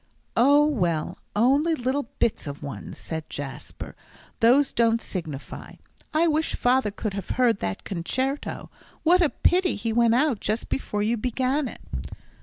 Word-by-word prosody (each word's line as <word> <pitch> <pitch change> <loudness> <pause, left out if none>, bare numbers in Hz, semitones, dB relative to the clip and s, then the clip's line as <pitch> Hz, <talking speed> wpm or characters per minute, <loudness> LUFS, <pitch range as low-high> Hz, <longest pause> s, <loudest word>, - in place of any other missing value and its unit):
"Oh, 285 +5 +6
well, 175 - -1 0.2
only 280 +9 +3
little 260 -1 -2
bits 220 - 0
of 145 +1 -7
ones," 140 - -7
said 160 -1 -6
Jasper; 140 -2 -7 0.4
"those 265 +5 +4
don't 230 -1 +3
signify. 160 -10 -6 0.4
I 325 +2 +3
wish 315 0 +1
father 250 -2 +2
could 205 0 -4
have 200 -2 -5
heard 240 -5 +3
that 95 0 -3
concerto. 260 - -3 0.3
What 355 +3 +5
a 325 - +4
pity 360 +4 +2
he 225 +2 -2
went 235 0 +4
out 260 -4 +2
just 215 +3 -2
before 210 -6 -2
you 230 +3 +1
began 255 +5 0
it." - - -10
235 Hz, 150 wpm, -25 LUFS, 200-285 Hz, 0.4 s, Oh